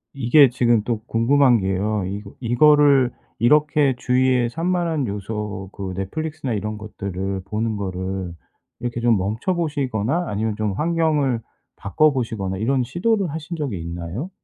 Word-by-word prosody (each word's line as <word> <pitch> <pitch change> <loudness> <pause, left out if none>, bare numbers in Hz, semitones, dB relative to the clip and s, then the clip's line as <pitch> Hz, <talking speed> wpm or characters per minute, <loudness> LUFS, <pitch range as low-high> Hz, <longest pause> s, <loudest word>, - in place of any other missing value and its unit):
이게 135 +1 +5
지금 120 -3 +2
또 115 -1 -2
궁금한 125 +2 +4
게요. 100 +2 -1
이거 100 +1 -6
이거를 135 +1 +4 0.3
이렇게 150 +2 +3
주위에 125 -1 +2
산만한 165 -1 -1
요소 100 -1 -5
그 95 -2 -5
넷플릭스나 150 +7 -3
이런 105 0 -3
것들을 100 -2 -5
보는 110 +1 -2
거를 95 -2 -4 0.5
이렇게 120 -1 -3
좀 115 -3 +3
멈춰 110 - -1
보시거나 140 -2 -1
아니면 105 +1 -2
좀 105 -2 -1
환경을 150 - +1 0.3
바꿔 150 +10 +2
보시거나 110 -7 -3
이런 125 +5 +1
시도를 190 - 0
하신 160 +2 -6
적이 140 - -3
있나요? 85 - -5
120 Hz, 315 characters per minute, -22 LUFS, 100-145 Hz, 0.5 s, 이게